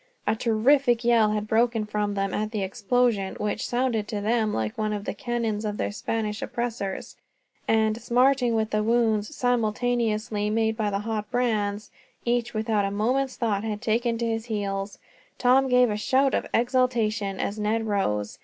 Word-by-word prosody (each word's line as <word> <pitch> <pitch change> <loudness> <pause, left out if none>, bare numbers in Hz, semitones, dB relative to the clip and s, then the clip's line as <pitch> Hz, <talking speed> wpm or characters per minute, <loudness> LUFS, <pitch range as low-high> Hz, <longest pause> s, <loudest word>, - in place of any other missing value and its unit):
A - - +2
terrific 240 +2 +2
yell 230 -2 +4
had 210 0 -2
broken 225 0 +2
from 210 -1 -2
them 195 0 -1
at 215 0 -1
the 215 -3 -2
explosion, 210 0 0
which 210 +1 -2
sounded 240 -4 0
to 210 - -3
them 220 +1 +1
like 110 - -2
one 215 -1 -1
of 205 -1 -4
the - - -2
cannons 235 -5 -2
of 210 -1 -3
their - - -2
Spanish 215 +1 -3
oppressors; 235 -7 -4 0.5
and, 220 0 +2
smarting 250 -1 +3
with 220 -1 0
the 215 - +1
wounds 225 +2 +1
simultaneously 225 -3 0
made 220 0 +1
by 215 -2 -1
the 200 - -1
hot 210 -1 -3
brands, 215 -4 -1 0.3
each, 240 0 0
without 215 -1 0
a 195 - 0
moment's 250 +6 0
thought, 215 -4 -1
had 215 -2 -3
taken 230 +1 0
to 235 - -2
his 225 0 -2
heels. 200 -3 -3 0.4
Tom 265 +2 +4
gave 250 -2 +4
a 210 - -1
shout 265 +5 +2
of - - 0
exultation, 230 -5 +1
as 205 +2 -2
Ned 220 +2 0
rose. 105 - -1
220 Hz, 175 wpm, -25 LUFS, 210-240 Hz, 0.5 s, yell